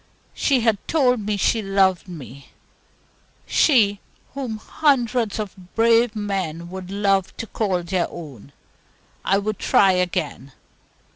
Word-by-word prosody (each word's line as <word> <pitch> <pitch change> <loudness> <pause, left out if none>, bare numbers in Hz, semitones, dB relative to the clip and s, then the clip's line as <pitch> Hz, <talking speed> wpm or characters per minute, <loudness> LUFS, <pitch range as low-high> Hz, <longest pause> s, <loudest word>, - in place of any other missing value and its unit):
She 270 -4 +1
had 225 -3 +2
told 255 -6 +2
me 210 -1 0
she 220 +3 +1
loved 195 -2 +1
me 140 -6 -11 1.0
she, 210 -9 +3 0.3
whom 260 -5 -4
hundreds 245 -4 0
of 190 -4 -8
brave 230 0 +3
men 185 -5 -3
would 185 -1 -7
love 195 -1 0
to - - -4
call 190 -5 -1
their 180 0 -1
own. 140 -6 -10 0.7
I 195 - +2
would 210 +1 -3
try 195 -1 +4
again. 180 -7 -2
200 Hz, 125 wpm, -22 LUFS, 180-225 Hz, 1.0 s, try